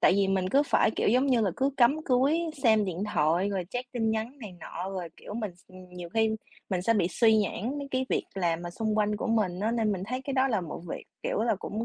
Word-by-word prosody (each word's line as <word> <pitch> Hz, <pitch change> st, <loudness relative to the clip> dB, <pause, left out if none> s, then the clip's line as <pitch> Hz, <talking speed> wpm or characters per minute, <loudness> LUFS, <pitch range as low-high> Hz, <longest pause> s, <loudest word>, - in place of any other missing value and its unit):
tại -, -, +6 dB
vì 195 Hz, -1 st, +2 dB
mình 190 Hz, -1 st, +1 dB
cứ 280 Hz, +6 st, +4 dB
phải, 280 Hz, -, +3 dB
kiểu, -, -, 0 dB
giống 255 Hz, +6 st, +3 dB
như 250 Hz, -4 st, +3 dB
là, 200 Hz, -, +2 dB
cứ 270 Hz, +1 st, +2 dB
cắm 275 Hz, +6 st, +4 dB
cúi, 270 Hz, +5 st, +3 dB, 0.2 s
xem 220 Hz, -3 st, +5 dB
điện 185 Hz, 0 st, -3 dB
thoại 165 Hz, +6 st, +2 dB
rồi 190 Hz, -3 st, -2 dB
check 250 Hz, +1 st, -5 dB
tin 225 Hz, -3 st, 0 dB
nhắn 225 Hz, +6 st, -3 dB
này 215 Hz, -6 st, -8 dB
nọ, 180 Hz, +2 st, -6 dB
rồi, 185 Hz, -3 st, -4 dB
kiểu, 210 Hz, -, -9 dB
mình 215 Hz, -6 st, -4 dB
x 180 Hz, -, -25 dB
ừm, 185 Hz, 0 st, -13 dB
nhiều 180 Hz, -1 st, -8 dB
khi 220 Hz, -1 st, +3 dB, 0.4 s
mình 180 Hz, -1 st, 0 dB
sẽ 230 Hz, -, +3 dB
bị 185 Hz, -5 st, +2 dB
suy 220 Hz, +4 st, +4 dB
nhãng 220 Hz, +6 st, -1 dB
mấy 280 Hz, -1 st, -5 dB
cái 260 Hz, 0 st, 0 dB
việc -, -, 0 dB
làm 170 Hz, -3 st, 0 dB
mà 175 Hz, -, -5 dB
xung 215 Hz, +3 st, -1 dB
quanh 210 Hz, 0 st, +2 dB
của 230 Hz, -, -3 dB
mình 205 Hz, -5 st, +1 dB
á, 220 Hz, +2 st, +1 dB
nên 225 Hz, -3 st, +1 dB
mình 185 Hz, -, -3 dB
thấy 255 Hz, +2 st, -3 dB
cái 275 Hz, 0 st, -4 dB
đó 265 Hz, +1 st, +3 dB
là 220 Hz, -6 st, +1 dB
một 165 Hz, -3 st, -6 dB
việc, -, -, -5 dB, 0.2 s
kiểu -, -, -1 dB
là, 225 Hz, -2 st, +2 dB
cũng 220 Hz, +4 st, -4 dB
215 Hz, 275 wpm, -28 LUFS, 185-245 Hz, 0.4 s, tại